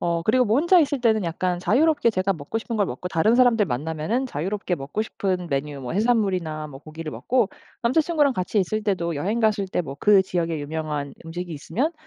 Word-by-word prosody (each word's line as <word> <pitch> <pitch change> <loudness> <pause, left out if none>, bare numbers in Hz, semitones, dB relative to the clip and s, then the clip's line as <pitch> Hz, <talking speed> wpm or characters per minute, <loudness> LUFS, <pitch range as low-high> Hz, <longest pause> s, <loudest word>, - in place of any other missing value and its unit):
어 170 -1 0
그리고 250 +3 +4
뭐 220 +2 +2
혼자 345 +3 +5
있을 285 -3 0
때는 220 -3 +3
약간 175 +1 -1
자유롭게 290 - +3
제가 190 -1 0
먹고 160 +5 -4
싶은 230 +1 -5
걸 205 -3 +2
먹고 180 - -6
다른 190 +7 +2
사람들 240 -5 +4
만나면은 160 - -2
자유롭게 190 - -2
먹고 145 +8 -3
싶은 185 -4 -2
메뉴 140 0 -2
뭐 125 +2 -5
해산물이나 190 -8 0
뭐 135 -2 -11
고기를 155 0 -8
먹고 245 -5 +1 0.3
남자 245 +7 +3
친구랑 300 -3 +2
같이 185 0 -1
있을 215 +3 0
때도 180 -5 -1
여행 195 +11 -1
갔을 215 -4 +1
때 180 - -1
뭐 140 -5 -6
그 205 -2 +6
지역에 170 -3 -2
유명한 150 -1 -4
음식이 175 +1 -6
있으면 250 - -2
190 Hz, 435 characters per minute, -24 LUFS, 160-230 Hz, 0.3 s, 그